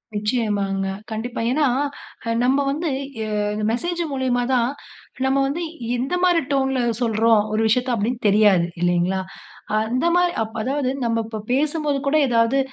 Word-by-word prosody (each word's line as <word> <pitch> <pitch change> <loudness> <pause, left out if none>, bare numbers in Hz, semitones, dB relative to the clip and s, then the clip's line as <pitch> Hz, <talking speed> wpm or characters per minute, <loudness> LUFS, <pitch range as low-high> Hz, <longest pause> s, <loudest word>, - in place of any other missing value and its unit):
நிச்சயமாங்க. 205 -3 -1 0.2
கண்டிப்பா. 225 +3 -4
ஏனா, 295 +3 +2 0.8
நம்ம 270 +3 +3
வந்து, 315 +3 -2 0.3
எ, - - -4 0.4
மெசேஜ் 345 +9 -2
மூலியமா 255 -2 0
தான், 240 -1 +2 0.6
நம்ம 265 +1 +2
வந்து, 295 +5 -3 0.4
இந்த 265 +8 -1
மாரி 350 -2 +4
டோன்ல 265 -1 +1 0.2
சொல்றோம், 225 -1 +3
ஒரு 215 - +1
விஷயத்த, 250 +4 +1
அப்படினு 230 +3 -1
தெரியாது. 200 -4 +4 0.2
இல்லைங்களா? 175 +2 +1 0.6
அந்த 235 +6 -1
மாரி 355 0 +3
அப் 220 +1 -9
அதாவது, 265 +2 -1 0.2
நம்ம 230 -1 0
இப்ப 220 -1 -6
பேசும்போது 295 +1 0
கூட, 280 - +2
ஏதாவது 230 +3 +3
245 Hz, 135 wpm, -22 LUFS, 215-275 Hz, 0.8 s, மாரி